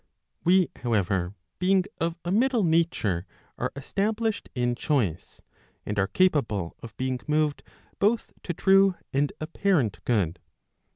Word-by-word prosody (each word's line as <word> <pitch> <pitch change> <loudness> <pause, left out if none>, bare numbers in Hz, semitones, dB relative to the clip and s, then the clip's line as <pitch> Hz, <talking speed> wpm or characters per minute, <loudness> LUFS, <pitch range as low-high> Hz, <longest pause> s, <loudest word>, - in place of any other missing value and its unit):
"YVe, 180 0 +4
however, 100 -5 0 0.2
being 185 +1 +3 0.2
of 165 +1 -1
a 175 - -1
middle 240 +2 +3
nature 160 - +1 0.3
are - - -1
established 210 +9 -1
in 120 -1 +1
choice; 115 - -1 0.4
and 105 -1 -2
are 100 - +2
capable 110 - +1
of 115 -2 -11
being 130 -1 -1
moved 150 -1 +1 0.4
both 220 +3 +1
to - - -3
true 195 +2 +4 0.2
and 140 +1 +2
apparent 155 - 0
good. 95 -8 0
150 Hz, 125 wpm, -26 LUFS, -, 0.4 s, YVe